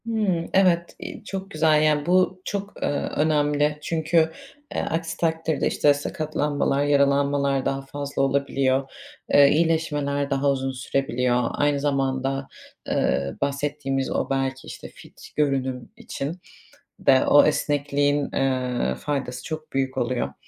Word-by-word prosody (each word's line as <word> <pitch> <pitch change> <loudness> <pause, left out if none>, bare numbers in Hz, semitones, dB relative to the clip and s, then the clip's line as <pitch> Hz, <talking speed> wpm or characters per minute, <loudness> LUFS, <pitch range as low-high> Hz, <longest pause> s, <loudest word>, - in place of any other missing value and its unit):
Hımm, 205 -7 -1
evet, 175 -3 +3
iii, - - -8
çok 195 -1 -6
güzel, 155 -1 +3
yani, 150 -1 +2
bu 185 +1 +2
çok, 200 0 -5
ııı, 145 - -1
önemli. 150 -1 +2
Çünkü, 160 0 +1 0.4
eee, - - 0
aksi 165 0 -3
takdirde, 160 -1 0
işte, 145 - +3
sakatlanmalar, 145 -1 -1
yaralanmalar 140 -1 +2
daha 135 0 -1
fazla 140 +1 -4
olabiliyor. 135 -1 +1 0.4
Eee, 140 -1 +7
iyileşmeler 150 -3 0
daha 140 0 +1
uzun 135 -1 -2
sürebiliyor. 125 -2 0
Aynı 145 -1 +1
zamanda, 135 -1 -1 0.4
eee, 70 +1 0
bahsettiğimiz 140 -1 -2
o, - - -1
belki, 135 0 -2
işte, - - -8
fit - - -15
görünüm 130 -4 -1
için 155 +6 -5 0.6
de 130 -1 +4
o 145 - +6
esnekliğin, 145 -1 +1
eee, 125 - 0
faydası 130 - -4
çok 155 -1 -7
büyük 135 -1 -1
oluyor. 120 - -1
145 Hz, 125 wpm, -24 LUFS, 135-155 Hz, 0.6 s, Eee